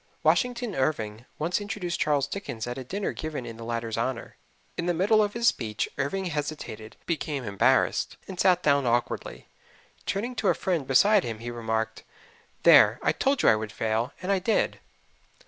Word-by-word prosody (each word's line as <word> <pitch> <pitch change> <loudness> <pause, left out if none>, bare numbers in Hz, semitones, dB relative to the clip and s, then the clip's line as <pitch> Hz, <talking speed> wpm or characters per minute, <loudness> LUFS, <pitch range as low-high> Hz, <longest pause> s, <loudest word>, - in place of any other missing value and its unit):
Washington 245 -3 +1
Irving 115 -7 -2
once 170 +6 -1
introduced 205 -4 -3
Charles 145 -3 +2
Dickens 120 - -5
at 120 0 -4
a - - -5
dinner 195 +10 -3
given 155 -5 -5
in 115 -1 -8
the 115 - -8
latter's 115 -1 -3
honor. 115 +1 -3 0.4
In 170 - -3
the 175 - +1
middle 210 +5 +4
of 205 -1 0
his 235 0 +1
speech 110 - 0
Irving 190 +8 -2
hesitated, 145 -9 -5
became 150 -4 -2
embarrassed, 100 -3 +2
and 185 -2 -8
sat 180 -1 +4
down 140 -3 +3
awkwardly. 120 0 -2 0.6
Turning 230 +6 -2
to 215 - 0
a - - +4
friend 170 -8 -1
beside 200 +9 +5
him 115 -2 -4
he 120 +2 -6
remarked, 110 -1 -2 0.6
"There, - - +7
I - - +3
told 275 0 +1
you - - +7
I - - +6
would 110 -1 -4
fail, 110 +3 -1
and 190 - 0
I 195 - +3
did." 205 +5 0
145 Hz, 180 wpm, -27 LUFS, 115-190 Hz, 0.6 s, There